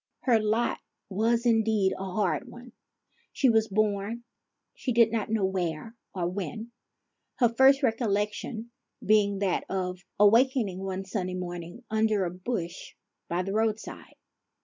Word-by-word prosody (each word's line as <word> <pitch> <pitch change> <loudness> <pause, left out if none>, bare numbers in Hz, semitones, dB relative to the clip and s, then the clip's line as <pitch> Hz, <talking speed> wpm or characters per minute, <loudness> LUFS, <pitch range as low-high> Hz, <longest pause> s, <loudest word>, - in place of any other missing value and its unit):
Her 240 -4 +3
lot 220 +3 0 0.3
was, 230 +4 +1
indeed, 220 -4 +3
a - - -6
hard 195 +5 -1
one. 245 +1 -12 0.6
She 265 -3 +3
was 220 -1 +3
born 210 +2 -1 0.5
she 255 - -3
did 230 -1 +4
not 225 -2 -2
know 215 -3 +1
where 185 +2 -3 0.2
or 175 -2 -1
when, 200 +5 -5 0.6
her 240 -3 +3
first 265 +4 +5
recollection 220 0 -1 0.3
being 200 -1 +3
that 195 -2 0
of 180 -1 -2 0.2
awakening 225 -2 +4
one 190 0 -4
sunny 185 -2 -3
morning 175 +4 -6
under 220 -3 +2
a 170 - -3
bush 180 -2 -5 0.3
by 175 +2 0
the 195 +1 -4
roadside. 220 0 -2
210 Hz, 135 wpm, -28 LUFS, 190-230 Hz, 0.6 s, first